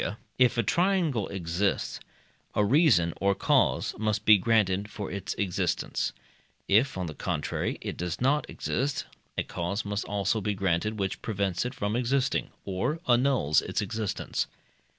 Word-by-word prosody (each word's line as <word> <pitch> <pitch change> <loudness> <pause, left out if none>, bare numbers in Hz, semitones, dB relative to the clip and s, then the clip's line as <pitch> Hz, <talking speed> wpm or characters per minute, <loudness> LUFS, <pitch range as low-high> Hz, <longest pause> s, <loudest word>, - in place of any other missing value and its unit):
if 125 -1 +4
a 120 - +3
triangle 170 - +1
exist, 95 +1 -1 0.5
a 105 - +3
reason 100 - +4
or 100 0 +3
cause - - +2
must 110 -1 0
be 110 - +9
granted 100 -1 +2
for 105 -2 -6
its 100 0 -4
existence; 95 -4 -1 0.6
if, 115 +4 +3
on 90 - -2
the 80 - -5
contrary, - - -2
it - - -5
does 90 -1 -3
not 135 +3 +1
exist, 140 +2 -2 0.3
a - - +1
cause 100 +5 -3
must 100 0 -2
also 105 +2 0
be 105 +1 -1
granted, 95 +3 0
which 95 -2 -2
prevents 100 -2 -1
it 125 +2 -4
from 105 -1 -1
existing, 130 +2 +1 0.2
or 100 - -1
annuls 125 - +3
its - - -2
existence. 110 -1 -2
105 Hz, 150 wpm, -28 LUFS, 95-125 Hz, 0.6 s, be